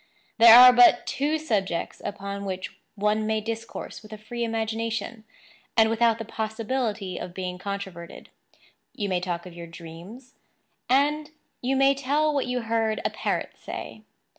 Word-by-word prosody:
There 230 0 +10
are 250 0 +10
but 245 0 +6
two 295 +3 0
subjects 205 - -2
upon 200 0 -5
which 185 -1 -5 0.2
one 210 +1 0
may 220 0 +1
discourse 225 +1 -6
with 215 0 -15
a 215 - -7
free 235 +3 -5
imagination, 225 0 -3 0.5
and 220 0 +5
without 230 0 +3
the 225 - -6
possibility 220 -2 -3
of 180 0 -7
being 180 -1 -5
controverted. 190 -3 -7 0.6
You 205 -2 -3
may 185 -1 +1
talk 175 -1 -4
of 180 - -10
your 170 0 -9
dreams; 175 +10 -12 0.6
and 295 +3 +2 0.3
you 260 +2 0
may 270 +1 +4
tell 290 +3 0
what 280 -3 0
you 250 0 -1
heard 225 -1 0
a - - +1
parrot - - -2
say. - - -8
220 Hz, 155 wpm, -25 LUFS, 200-245 Hz, 0.6 s, There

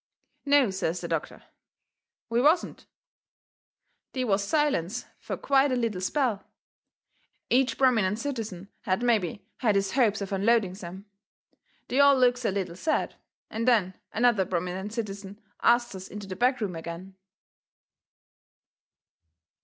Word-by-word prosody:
"No," 280 -6 +4
says 180 -2 -2
the - - -5
doctor, - - -4 0.8
"we 235 0 +1
wasn't." 315 +6 +2 1.3
They 255 - -1
was 200 -4 +1
silence 245 - 0
fur - - -5
quite 275 0 +3
a - - +2
little 230 -6 -1
spell. 235 0 0 1.1
Each 255 +1 +3
prominent 220 -7 +3
citizen 220 -8 -5 0.2
had 190 +4 0
mebby 205 -5 0
had 215 -5 +2
his 195 -1 +1
hopes 225 -6 +2
of 200 -1 -5
unloading 200 0 +2
some. 190 +1 -9 0.8
They 260 - 0
all 280 -1 +7
looks 250 -1 +3
a - - +3
little 190 -3 -3
sad, 310 - -1 0.4
and 230 +2 -2
then 210 -7 +3 0.2
another 230 -3 +3
prominent 180 +3 -3
citizen 205 -3 -6 0.2
asts 240 -1 +3
us 190 -1 -8
into 205 0 -8
the 190 -1 -6
back 250 +4 +1
room 195 -5 -2
agin. 170 +3 -7
210 Hz, 130 wpm, -27 LUFS, 190-250 Hz, 1.3 s, all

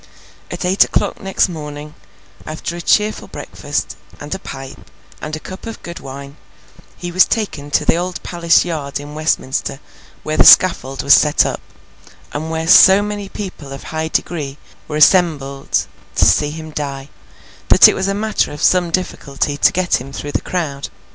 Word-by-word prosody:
At - - -5
eight 185 +2 +4
o'clock 205 - -2
next 195 +1 +1
morning, 150 -3 -8 0.5
after 155 +2 -5
a 175 - -6
cheerful 210 +4 +1
breakfast, - - -5 0.2
and 145 +3 -6
a 190 - -5
pipe, 135 -7 -10 0.3
and 155 0 -5
a - - -7
cup 185 +7 -10
of 225 - -8
good 170 0 -8
wine, 140 +1 -10 0.6
he 175 -1 -6
was 185 +2 +6
taken 155 -10 -3
to 145 - +2
Old 180 +1 -4
Palace 170 -1 +2
Yard 150 -6 -4
in 145 +1 -9
Westminster, 150 -3 -2 0.4
where 155 0 -3
the - - +6
scaffold 135 -8 +5
was 140 - +6
set 150 0 +4
up, - - -3 0.7
and 155 +2 -4
where 160 0 -3
so 190 +3 +7
many 205 -1 -5
people 180 -10 -8
of 135 - -8
high 160 0 -4
degree 150 -4 -3 0.3
were 150 - -5
assembled 150 -5 +2 0.3
to - - +4
see 150 - +3
him 155 +1 -8
die, 140 -2 -5 0.6
that - - +8
it - - +2
was 190 - -2
a 195 - -1
matter 215 +1 -1
of 145 - -7
some 180 -2 +3
difficulty 145 -5 -2
to 145 - +4
get 180 -7 0
him 135 +2 -10
through 145 +1 -6
the - - -1
crowd. 145 -6 -4
155 Hz, 175 wpm, -17 LUFS, 145-185 Hz, 0.7 s, that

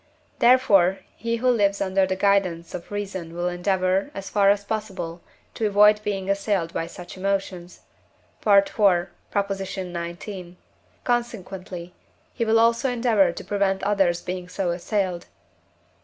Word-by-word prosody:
therefore 200 -7 +5 0.2
he 230 0 -2
who 240 +2 -1
lives 205 -5 +3
under 190 -1 +1
the 190 - -1
guidance 190 -4 +1
of 170 - -7
reason 190 -5 -5
will 175 +1 -1
endeavour, 185 +4 0
as 195 0 -6
far 200 -1 +4
as 200 0 +2
possible, 190 -6 -4 0.3
to 220 - -1
avoid 210 +1 +5
being 195 -2 -3
assailed 195 -4 0
by 165 - -2
such 175 +1 -10
emotions 185 -2 -3 0.6
(IV. 200 -2 +6
xix.); 195 0 -1 1.2
consequently, 195 -7 -3 0.4
he - - -1
will 225 0 +3
also 230 +4 +3
endeavour 230 -7 +3
to - - -8
prevent 195 -2 0
others 195 -4 +1
being 180 0 -5
so 180 -1 -1
assailed 180 0 -2
(IV. - - -31
195 Hz, 135 wpm, -24 LUFS, 180-210 Hz, 1.2 s, IV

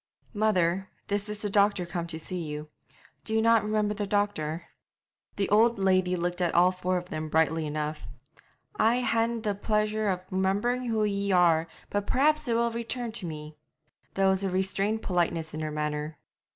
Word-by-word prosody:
'Mother, 190 -3 +1 0.2
this 205 +1 -1
is 210 0 -4
the 205 - -1
doctor 200 -2 +3
come 170 -1 -4
to 165 -1 -5
see 180 +2 -4
you. 150 -1 -6 0.5
Do 220 - -2
you - - +4
not 230 -1 +5
remember 210 0 0
the 205 -1 -3
doctor?' 175 -6 -1 0.7
The 200 - 0
old 230 +3 +4
lady 185 -2 +2
looked 175 +1 -2
at 175 -2 +1
all 180 +1 +6
four 185 0 -1
of 180 0 -6
them 155 0 -4
brightly 160 0 +2
enough. 150 -4 -4 0.7
'I 235 +3 +3
haena 230 -1 +1
the 210 -2 0
pleasure 215 +1 0
of 180 -1 -1
remembering 205 +7 0
who 220 -2 +1
ye 200 -1 0
are, 170 -3 +4 0.2
but 205 0 -1
perhaps 305 +2 +2
it 235 - +1
will 235 0 +2
return 235 +1 -4
to 215 -6 -5
me.' 150 -1 -8 0.6
There 195 0 +3
was 190 0 +2
restrained 195 +3 0
politeness 170 -3 -1
in 155 - -4
her 155 -1 -2
manner. 150 0 -3
190 Hz, 180 wpm, -28 LUFS, 170-215 Hz, 0.7 s, all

